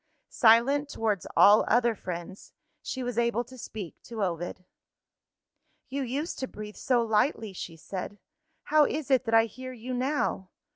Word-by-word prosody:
Silent 260 +5 +4
towards 215 -7 -1
all 210 +2 +7
other 235 0 +3
friends, 185 -1 -7 0.3
she 260 - -4
was 245 -1 -2
able 235 0 +1
to 255 +2 -14
speak 210 -7 -7
to 225 -3 -5
Ovid. 175 0 -3 1.2
"You 275 +2 -3
used 275 +6 -3
to 260 - -2
breathe 210 -2 -9
so 245 -2 +1
lightly," 220 -1 +1
she 170 -2 -7
said. 190 +4 -6 0.5
"How 305 -1 +4
is 295 -2 -3
it 260 -1 +4
that 225 0 +2
I 225 0 +6
hear 255 +4 -8
you 250 +1 -6
now. 250 -7 -1
235 Hz, 155 wpm, -28 LUFS, 205-255 Hz, 1.2 s, all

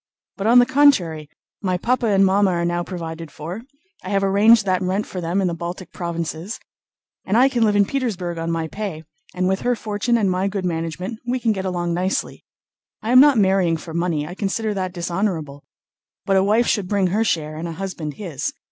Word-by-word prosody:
But 200 +1 -2
on 240 +2 +6
the 245 - +7
contrary, 220 - +3 0.3
my 185 -2 0
papa 240 +5 0
and 195 -2 +4
mamma 195 +1 +3
are 170 -1 0
now 175 0 0
provided 165 -3 -6
for—I 265 - -10
have 195 -1 +1
arranged 205 +3 +5
that 185 -1 +1
rent 190 +3 -1
for 185 - -6
them 175 +4 0
in 190 - +1
the 175 - -1
Baltic 175 +2 -6
Provinces—and 170 +4 -6
I 255 +2 +6
can 245 -4 +1
live 210 -2 +3
in 200 0 +4
Petersburg 190 -10 -3
on 165 0 -3
my 165 -1 -1
pay, 190 -4 -5 0.3
and 185 0 0
with 190 +1 +1
her 245 0 +1
fortune 215 +2 -1
and 200 -4 +1
my 185 +2 0
good 195 -1 -3
management 175 +5 -3
we 255 +1 0
can 230 -2 +1
get 190 -2 -3
along 175 -2 -1
nicely. 185 +3 -2 0.6
I 225 - -1
am 255 - +8
not 285 -2 +7
marrying 190 -4 +3
for 160 +1 -9
money—I 170 -1 -1
consider 210 +3 -2
that 185 -2 -3
dishonorable—but 170 +1 -4
a 190 - +4
wife 215 +4 +3
should 205 -5 0
bring 200 -1 +1
her 220 +2 +2
share 155 -7 -1
and 165 +2 -5
a 165 - -5
husband 170 -5 -5
his. 155 -8 -4
190 Hz, 200 wpm, -21 LUFS, 170-215 Hz, 0.6 s, am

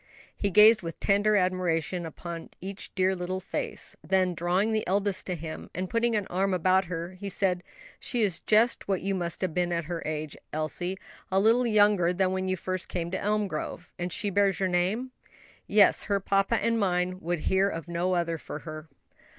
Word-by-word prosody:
He 200 - -1
gazed 215 +3 +7
with 165 -2 -6
tender 205 +1 +3
admiration 180 -2 0
upon 170 +1 -7
each 195 +1 -6
dear 190 0 +2
little 185 +1 -3
face; 190 - -4
then, 185 -1 +2
drawing 180 +6 +1
the 215 -1 +1
eldest 200 +1 0
to 180 - -1
him 160 -1 -7
and 185 +1 -3
putting 230 0 +1
an 205 -2 0
arm 190 +1 0
about 185 +2 +3
her, 170 +1 -5
said, 185 -2 +1 0.4
"She 240 -3 -1
is 185 -4 0
just 220 +3 +2
what 195 -3 0
you 195 0 0
must 175 -3 -2
have 185 -4 -1
been 175 0 0
at 170 -1 -1
her 170 0 -4
age, 155 -1 -4 0.2
Elsie; 175 +4 -2 0.3
a 190 - +3
little 230 +4 +4
younger 205 -5 +4
than 185 0 +1
when 190 0 -1
you 185 0 0
first 185 +1 -4
came 170 -1 -3
to 190 - -2
Elmgrove. 200 -5 -2
And 175 +1 -3
she 205 +3 -1
bears 200 0 +2
your 190 -1 +1
name?" 190 +9 0 0.6
"Yes; 205 0 +4
her 200 -1 +1
papa 195 +3 +1
and 230 0 +1
mine 185 -2 0
would 175 -2 -2
hear 190 +3 +2
of 165 -3 -6
no 175 +2 0
other 170 -2 -1
for - - -7
her." 155 -1 -8
185 Hz, 190 wpm, -28 LUFS, 175-200 Hz, 0.6 s, gazed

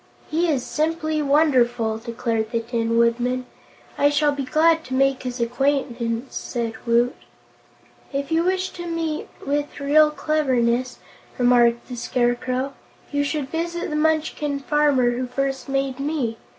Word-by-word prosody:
"He 335 +3 +2
is 270 -5 0
simply 310 0 -1
wonderful," 250 -7 +2
declared 230 -1 -2
the 230 -1 0
Tin 230 0 -1
Woodman. 245 +2 +1 0.5
"I 285 - +5
shall 290 0 +2
be 285 -1 -3
glad 320 +4 +3
to 260 - -4
make 270 0 +2
his 250 -1 -5
acquaintance," 245 -1 -1
said 235 -2 -3
Woot. 235 +1 +3 1.0
"If 280 +1 -3
you 325 +1 +3
wish 370 +1 0
to 345 -1 -7
meet 330 -2 -2 0.2
with 290 +1 -2
real 300 +2 +5
cleverness," 255 -5 0 0.4
remarked 240 -1 +3
the 250 - -6
Scarecrow, 250 +2 -1 0.4
"you 285 0 +1
should 285 -2 -2
visit 340 0 -3
the - - -1
Munchkin 305 -2 0
farmer 280 -4 +3
who 250 +1 -3
first 270 +2 -2
made 270 -1 -1
me. 275 -6 -2
270 Hz, 140 wpm, -23 LUFS, 240-300 Hz, 1.0 s, I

